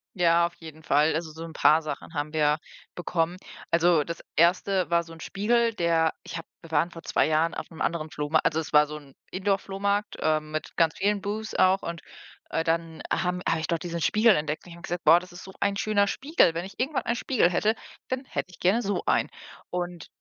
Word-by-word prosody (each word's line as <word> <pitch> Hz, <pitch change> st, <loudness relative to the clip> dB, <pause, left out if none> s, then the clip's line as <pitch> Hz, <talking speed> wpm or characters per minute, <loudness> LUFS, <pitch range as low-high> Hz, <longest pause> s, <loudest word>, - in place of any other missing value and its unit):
Ja, 170 Hz, -1 st, +4 dB
auf 170 Hz, -, -4 dB
jeden 160 Hz, -1 st, -12 dB
Fall. 150 Hz, +2 st, +3 dB
Also, 160 Hz, 0 st, -3 dB
so 160 Hz, +1 st, -8 dB
'n 165 Hz, -, -8 dB
paar 155 Hz, +1 st, +5 dB
Sachen 155 Hz, +1 st, -6 dB
haben 150 Hz, 0 st, -3 dB
wir 150 Hz, -1 st, +2 dB, 0.3 s
bekommen. 175 Hz, 0 st, -1 dB, 0.3 s
Also, 170 Hz, -2 st, +4 dB
das 170 Hz, +2 st, -7 dB
1. 185 Hz, +2 st, +3 dB
war 170 Hz, 0 st, +4 dB
so 165 Hz, -, -14 dB
'n 165 Hz, -, -11 dB
Spiegel, 230 Hz, +7 st, +1 dB
der 165 Hz, -4 st, +2 dB
ich -, -, -7 dB
habe 165 Hz, -, -8 dB
wir 165 Hz, -, -14 dB
waren 160 Hz, +3 st, +2 dB
vor 165 Hz, -, -10 dB
2 -, -, +1 dB
Jahren 160 Hz, +2 st, +1 dB
auf -, -, -6 dB
'nem 160 Hz, -, -10 dB
anderen 160 Hz, -2 st, -1 dB
Flohma 150 Hz, +2 st, +1 dB
also, 160 Hz, -, +1 dB
es 160 Hz, -, -5 dB
war 150 Hz, 0 st, +7 dB
so 150 Hz, +1 st, -7 dB
'n 140 Hz, -3 st, -16 dB, 0.2 s
Indoor-Flohmarkt, 200 Hz, +1 st, -1 dB
ähm, 155 Hz, -1 st, 0 dB
mit 155 Hz, 0 st, -5 dB
ganz 165 Hz, -1 st, +3 dB
vielen 205 Hz, +1 st, +2 dB
Boots 215 Hz, +2 st, -4 dB
auch 185 Hz, +1 st, +4 dB
und, 170 Hz, 0 st, -5 dB, 0.5 s
äh, 160 Hz, -, 0 dB
dann, 165 Hz, 0 st, -1 dB
haben 180 Hz, 0 st, 0 dB
habe 165 Hz, -, +1 dB
ich 160 Hz, -, -3 dB
dort 170 Hz, -1 st, -1 dB
diesen 170 Hz, -1 st, -4 dB
Spiegel 215 Hz, +4 st, +4 dB
entdeckt 150 Hz, 0 st, -3 dB
und -, -, -13 dB
ich 170 Hz, -, -10 dB
habe 170 Hz, -, -15 dB
gesagt: 175 Hz, -2 st, -4 dB
„Boah, 165 Hz, +3 st, +7 dB
ist 180 Hz, +1 st, -12 dB
so 190 Hz, -, -10 dB
ein 200 Hz, 0 st, +1 dB
schöner 205 Hz, 0 st, +2 dB
Spiegel. 275 Hz, -, +2 dB
Wenn 170 Hz, +2 st, -3 dB
ich 195 Hz, +3 st, -12 dB
irgendwann 270 Hz, +3 st, 0 dB
einen 235 Hz, -, 0 dB
Spiegel 240 Hz, -7 st, +2 dB
hätte, 210 Hz, +5 st, +2 dB, 0.4 s
dann 260 Hz, +1 st, -2 dB
hätte 185 Hz, -, -4 dB
ich -, -, -16 dB
gerne 205 Hz, +7 st, +2 dB
so 200 Hz, 0 st, -1 dB
einen.“ -, -, +2 dB, 0.4 s
Und 175 Hz, -2 st, -4 dB
170 Hz, 225 wpm, -26 LUFS, 160-195 Hz, 0.5 s, war